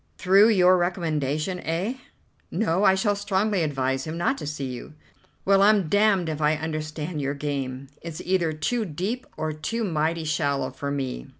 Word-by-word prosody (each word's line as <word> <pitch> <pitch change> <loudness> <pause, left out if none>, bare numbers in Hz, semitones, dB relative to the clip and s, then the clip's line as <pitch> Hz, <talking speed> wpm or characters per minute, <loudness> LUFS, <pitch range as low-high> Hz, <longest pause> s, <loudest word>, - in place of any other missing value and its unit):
"Through 195 +4 +5
your 185 -3 +5
recommendation, 165 -1 -1
eh?" 180 - -2 0.5
"No, 190 -2 0
I 190 -2 +6
shall 205 +1 +1
strongly 200 0 0
advise 135 -3 -1
him 160 +1 -5
not 175 +11 +1
to - - -6
see 150 -2 -4
you." 130 +3 -7 0.5
"Well, 195 0 +5
I'm 200 -5 +4
damned 205 -3 +3
if 155 -1 -3
I 150 +1 +3
understand 155 0 -4
your 140 +1 -2
game. 140 -2 -4
It's 165 -2 -7
either 180 -3 +1
too 155 +10 -1
deep 200 +8 -4
or 155 0 -2
too 225 +10 -3
mighty 165 -3 0
shallow 140 -4 0
for 140 +2 -5
me." 135 - -3
160 Hz, 170 wpm, -25 LUFS, 150-190 Hz, 0.5 s, I